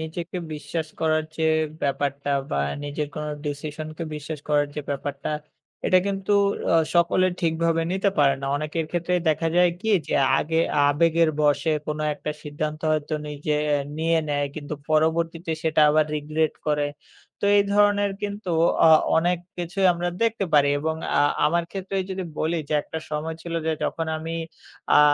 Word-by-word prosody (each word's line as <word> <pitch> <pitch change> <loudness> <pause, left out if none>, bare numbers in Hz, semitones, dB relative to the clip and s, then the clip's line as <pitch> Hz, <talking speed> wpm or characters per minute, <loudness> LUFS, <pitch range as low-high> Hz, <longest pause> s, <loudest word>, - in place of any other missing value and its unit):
নিজেকে 165 +3 -5 0.2
বিশ্বাস 155 +1 -4
করার 155 -1 +2
যে 160 - -2 0.4
ব্যাপারটা 140 0 -1 0.2
বা - - 0 0.3
নিজের 145 0 -3
কোন 150 - -4 0.2
decision-কে 155 +2 -5
বিশ্বাস 150 0 -6
করার 145 -1 +3
যে 150 - -3
ব্যাপারটা 140 0 -4 0.6
এটা 185 - +5
কিন্তু 195 0 -1 0.4
অ - - +4 0.2
সকলে 175 +2 +4
ঠিকভাবে 165 0 +1
নিতে 195 +1 +1
পারে 140 -2 +5
না। 135 - -4
অনেকের 155 +2 -2
ক্ষেত্রেই 175 +1 0
দেখা 165 +1 +1
যায় 180 0 +5
কি 220 - -3 0.2
যে - - -1 0.2
আগে 160 +1 0 0.3
আবেগের 165 +2 +3
বশে 145 +1 +2 0.2
কোন 150 0 -3 0.2
একটা 150 - -5
সিদ্ধান্ত 150 +1 -4
হয়তো 155 0 -1
নিজে, 150 +1 -2 0.4
নিয়ে 165 +1 +2
নেয় 145 -1 0
কিন্তু 150 -1 -5 0.2
পরবর্তীতে 165 +2 +1
সেটা 160 -1 +2
আবার 155 0 +4
regret 155 +1 0
করে। 150 -1 +1 0.6
তো - - +4
এই 200 - +4
ধরনের 205 -1 +3
কিন্তু 205 -2 -4 0.4
অ - - +8 0.3
অনেক 175 +2 +2 0.2
কিছুই 175 +2 0
আমরা 175 +1 -2
দেখতে 225 -3 +1
পারি 145 -1 +6
এবং 160 +1 -1 0.2
আ - - +5 0.3
আমার 170 +2 +1
ক্ষেত্রেই 195 0 -2
যদি 190 0 -3 0.2
বলি 165 +2 0
যে - - 0
একটা 160 - -6
সময় 155 +1 -3
ছিল 170 -1 -5
যে 160 - +2
যখন 165 - -2
আমি 165 +1 -5 0.6
আ - - +8
160 Hz, 160 wpm, -24 LUFS, 150-170 Hz, 0.6 s, অ